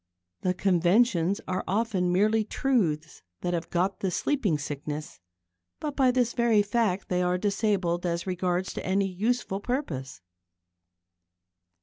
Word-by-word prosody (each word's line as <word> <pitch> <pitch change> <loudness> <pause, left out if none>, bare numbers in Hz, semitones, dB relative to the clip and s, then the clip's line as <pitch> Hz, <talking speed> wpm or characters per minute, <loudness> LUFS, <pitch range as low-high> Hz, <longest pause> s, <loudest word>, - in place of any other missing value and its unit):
The 185 0 0
conventions 185 +1 +2
are 185 0 -1
often 195 -3 +1
merely 215 +4 +3
truths 180 - -1 0.2
that 175 - -1
have 170 0 -2
got 185 +3 0
the 195 - 0
sleeping 205 - 0
sickness; 145 - -5 0.6
but 295 -2 -4
by 265 -2 +4
this 245 -1 +1
very 235 -4 +3
fact 205 -3 0
they 180 0 0
are 180 0 +1
disabled 195 -3 0
as 170 -1 -1
regards 180 0 -1
any 195 +1 +1
useful 195 +1 -1
purpose. 165 - -3
190 Hz, 125 wpm, -27 LUFS, 175-220 Hz, 0.6 s, by